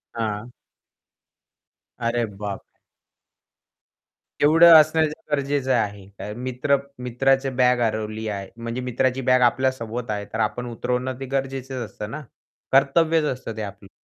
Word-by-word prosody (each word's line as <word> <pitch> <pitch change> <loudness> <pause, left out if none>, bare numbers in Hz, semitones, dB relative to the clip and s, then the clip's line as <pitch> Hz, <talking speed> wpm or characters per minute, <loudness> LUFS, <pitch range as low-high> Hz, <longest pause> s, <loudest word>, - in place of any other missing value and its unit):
हां. 110 0 -3 1.5
अरे 115 0 0
बापरे! 100 -1 -8 1.6
तेवढं 165 +3 +8
असणं 155 +1 +3 0.3
गरजेचं 140 -2 0
आहे. 100 -2 -3
मित्र 130 +4 0 0.3
मित्राची 135 +2 +1
बॅग 125 0 +4
हरवली 110 -1 -2
आहे. 100 -2 -4
म्हणजे 115 +2 -4
मित्राची 125 +1 0
बॅग 130 0 +5
आपल्या 130 +2 +1
सोबत 115 -1 -6
आहे 100 -1 -3
तर 110 - -3
आपण 110 +3 -1
उतरवणं 125 +2 -2
ते 135 - -5
गरजेचं 135 -2 -3
असतं 105 0 -8
ना. 150 - -5 0.5
कर्तव्यच 155 +4 +4
असतं 125 -6 -3
ते - - -3
आपलं. 100 -1 -8
125 Hz, 125 wpm, -23 LUFS, 110-135 Hz, 1.6 s, तेवढं